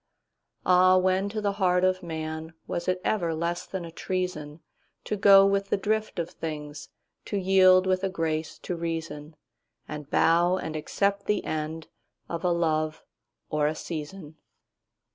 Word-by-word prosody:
'Ah, 185 0 +6
when 185 +2 +1
to 215 +1 -4
the 205 -1 0
heart 180 -1 +3
of 185 0 +2
manWas 160 0 -6
it 185 0 +1
ever 170 -6 0
less 170 +2 -2
than 190 -3 -5
a 165 - -9
treasonTo 170 -4 -4 0.6
go 195 0 +8
with 195 0 +1
the - - +2
drift 215 0 -1
of 170 -1 -3
things, 150 -2 -6 0.4
To 205 - -2
yield 185 -1 +5
with 185 0 +1
a 195 - +1
grace 160 -3 -2
to 180 - -2
reason, 165 -2 -5 0.5
And 150 -1 -7
bow 170 +4 +3
and 160 -4 -5
accept 200 +6 -1
the 210 - +1
endOf 155 +1 -4 0.5
a - - 0
love 155 -3 0 0.5
or 150 -1 +2
a 155 - -1
season? 155 0 -7
170 Hz, 145 wpm, -27 LUFS, 155-190 Hz, 0.6 s, go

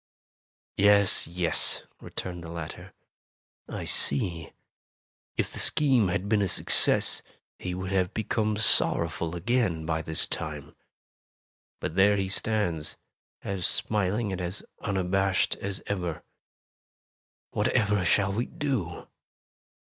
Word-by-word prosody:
"Yes, 100 -1 +5
yes," 85 -1 -1 0.2
returned 90 -2 -7
the 85 - -8
latter, 85 -2 -7 0.8
"I - - -5
see. 85 +3 +2 0.9
If - - -1
the - - -3
scheme 130 -8 +4
had 90 +2 -2
been 105 0 +2
a 100 - +1
success, - - +3 0.4
he 90 0 -4
would 95 +1 -5
have 95 -1 +1
become 110 -1 -1
sorrowful 85 -5 +3
again, 90 -4 0
by 80 0 -1
this 80 0 0
time. - - -5 1.0
But - - -4
there 100 +3 +4
he 95 -1 -1
stands, 95 -7 -1 0.5
as 95 -3 -1
smiling 105 +1 0
and 95 -1 -4
as 90 +3 -4 0.2
un 100 -2 -2
abashed 95 0 +1
as 100 -1 -4
ever. 90 -5 -3 1.3
Whatever 100 -2 +1
shall 95 +3 +2
we 115 +4 -1
do?" 120 - -3
95 Hz, 115 wpm, -27 LUFS, 85-105 Hz, 1.3 s, Yes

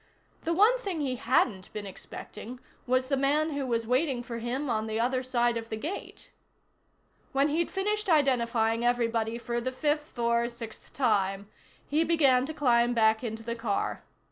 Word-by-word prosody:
The 335 - +1
one 430 +8 +5
thing 385 -9 -3
he 260 -3 -1
hadn't 225 -5 +1
been 210 -1 -5
expecting 210 +4 -9 0.3
was 255 +1 +2
the 275 +1 0
man 290 +4 +2
who 285 -2 -2
was 230 -2 0
waiting 255 +1 +1
for 235 -1 -5
him 250 +5 -2
on 220 -3 -1
the 220 0 -2
other 255 +2 +1
side 240 -2 +1
of 225 0 -6
the - - -2
gate. 310 - -7 1.0
When 275 +2 +3
he'd 325 +3 0
finished 420 +1 -1
identifying 235 -6 +2
everybody 230 -2 +1
for 235 0 -3
the 255 +2 -2
fifth 295 +2 -1
or 235 0 +1
sixth 235 -2 -10
time, 200 -5 0 0.4
he 305 +3 +2
began 275 -6 +3
to - - -4
climb 240 -4 +3
back 220 0 +3
into 225 -1 -4
the 235 +1 -3
car. 225 -3 -2
245 Hz, 170 wpm, -28 LUFS, 230-285 Hz, 1.0 s, one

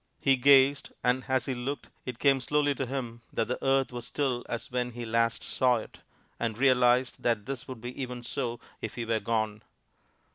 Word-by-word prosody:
He 135 -1 +4
gazed, 140 +2 +5
and 125 +1 +2
as 130 -1 +1
he 135 - -1
looked 130 +3 -4 0.2
it 125 -2 -4
came 135 0 +3
slowly 145 +1 +2
to 135 -1 -3
him 120 -3 -4
that 115 - 0
the 125 - -3
earth 135 -1 +2
was 120 0 -5
still 125 -1 -1
as 115 - -4
when 125 -1 -1
he 120 0 -5
last 115 0 +1
saw 125 -1 +2
it, 110 - -6 0.4
and 115 -2 -2
realized 125 -1 +3
that 115 -4 +1
this 130 -2 -5
would 130 -4 -8
be 120 +1 -5 0.3
so 120 0 -2
even - - -18 0.2
if 110 - -5
he 120 - -3
were 115 -1 +1
gone. 110 -2 -1
125 Hz, 195 wpm, -29 LUFS, 115-135 Hz, 0.4 s, gazed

